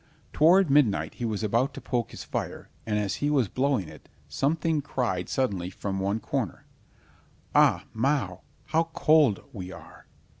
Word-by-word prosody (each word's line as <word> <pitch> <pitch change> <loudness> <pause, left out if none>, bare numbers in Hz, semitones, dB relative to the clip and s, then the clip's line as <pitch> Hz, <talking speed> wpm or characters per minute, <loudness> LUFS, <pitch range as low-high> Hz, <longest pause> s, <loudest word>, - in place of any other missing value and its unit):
Toward 170 +1 +5
midnight 105 - +3
he 120 - -5
was 110 -1 -2
about 115 +6 +1
to - - -6
poke 120 -3 -2
his - - -8
fire, - - -5 0.2
and 105 -1 0
as 105 -2 -1
he 145 - 0
was 135 -7 +2
blowing 130 - 0
it, 75 -1 -14 0.2
something 155 +2 0
cried 115 -10 -2
suddenly 100 -9 -1
from 95 +1 -4
one 100 +3 0
cornier, - - -3 0.9
"Au, - - +5
miau! 115 -7 0 0.2
how 165 +2 +1
cold 150 -10 +4
we 90 -2 -7
are!" - - -13
120 Hz, 155 wpm, -27 LUFS, 95-145 Hz, 0.9 s, Toward